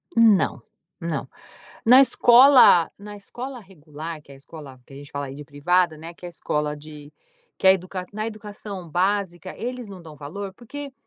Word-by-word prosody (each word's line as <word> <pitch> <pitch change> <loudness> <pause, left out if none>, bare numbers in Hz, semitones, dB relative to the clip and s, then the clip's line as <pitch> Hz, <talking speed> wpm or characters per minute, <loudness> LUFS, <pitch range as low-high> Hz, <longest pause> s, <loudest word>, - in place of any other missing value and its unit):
Não, 225 -4 +4 0.4
não. - - -4 0.6
Na 250 +3 +8
escola 250 - +6
na 205 +1 -10
escola 245 +5 -8
regular 160 -4 -9
que 140 - -16
é - - -12
a - - -15
escola, 140 -2 -12
que - - -17
a - - -11
gente 140 0 -12
fala 140 0 -4
aí 135 - -8
de 145 +1 -9
privada, 165 +4 +1
né, 165 +2 -10
que 180 - -16
é - - -5
a - - -10
escola 150 -3 -3
de, 150 0 -13 0.5
que - - -1
a 190 - +9
edu 185 -1 -4 0.2
na 215 +1 -3
educação 205 -4 -8
básica 185 +1 -1
eles 250 0 -5
não 195 -3 -11
dão 160 -3 -13
valor, 190 +8 -7
porque, 280 +6 -9
185 Hz, 190 wpm, -23 LUFS, 150-215 Hz, 0.6 s, a